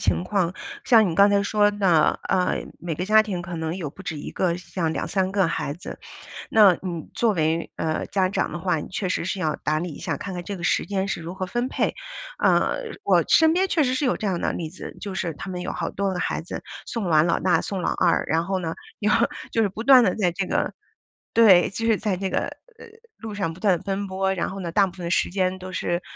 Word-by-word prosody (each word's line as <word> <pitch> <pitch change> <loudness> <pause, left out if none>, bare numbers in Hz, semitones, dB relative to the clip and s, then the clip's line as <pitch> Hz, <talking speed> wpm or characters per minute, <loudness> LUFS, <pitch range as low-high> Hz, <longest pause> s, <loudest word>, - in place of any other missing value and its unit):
情 175 - +1
况， 185 -3 0 0.3
像 225 -5 +5
你 165 - -2
刚 200 +3 +6
才 200 - +3
说 205 0 +3
的， 185 -7 +3
呃， 185 -1 +1
每 170 -3 -4
个 180 - -2
家 215 +1 +6
庭 200 -5 -4
可 175 0 -6
能 160 +1 -3
有 170 -6 -4
不 185 - -12
止 165 -6 -5
1 - - -7
个 175 -2 0
像 170 -2 -3
2、3 190 +2 -1
个 195 -2 +2
孩 150 -3 -2
子， 165 - -9 0.5
那 210 -4 +7
你 170 -4 -5
作 230 -3 +2
为， 160 -1 0
呃， 160 -1 -1
家 190 -2 +1
长 195 - -1
的 - - -5
话， 180 -1 0
你 150 - -5
确 190 0 -3
实 180 - -1
是 190 +1 -3
要 155 -4 0
打 155 +1 -1
理 175 +2 -3
一 - - -10
下， - - -3
看 195 -2 -6
看 175 - -5
这 200 +2 -5
个 175 - -8
时 - - +1
间 195 -1 -1
是 195 - -2
如 170 +1 -6
何 190 0 -4
分 240 +6 -1
配， - - -1 0.4
呃。 - - +2 0.2
我 - - +4
身 320 -1 +5
边 375 +3 +2
确 335 -4 +2
实 255 -1 +1
是 275 +2 0
有 250 - +2
这 215 - -3
样 180 -3 -1
的 - - 0
例 165 -2 -4
子， 180 - -9
就 200 -2 -5
是 170 -3 -2
他 190 +6 -8
们 180 -1 -4
有 - - -3
好 165 - -3
多 200 -1 -2
个 180 - -3
孩 - - -1
子， 165 - -7 0.2
送 230 -5 -3
完 155 -1 +5
老 170 - +1
大 185 -1 +3
送 195 -3 -4
老 - - 0
二， 175 -2 +2
然 165 +1 +1
后 190 +1 -1
呢， 165 -2 -3 0.3
就 210 - +2 0.4
就 225 - +2
是 205 - +1
不 210 +4 -7
断 255 -1 +8
地 - - +2
在 180 -5 +1
这 195 +2 -2
个 - - -1 0.6
对， 200 -6 +6
就 225 +4 -3
是 225 - +4
在 205 -3 -1
这 190 +1 -2
个， - - +1
呃， 465 -2 -9 0.3
路 220 -2 -7
上 195 -5 -2
不 175 - -15
断 195 -5 +3
奔 200 +1 -3
波， 190 0 -1
然 180 - -2
后 195 - -7
呢， 170 -3 -4
大 200 +2 +4
部 185 - -8
分 180 - -7
的 170 - -3
时 - - +1
间 185 0 0
都 185 0 -8
是， 175 -1 -1
185 Hz, 270 characters per minute, -24 LUFS, 170-205 Hz, 0.6 s, 断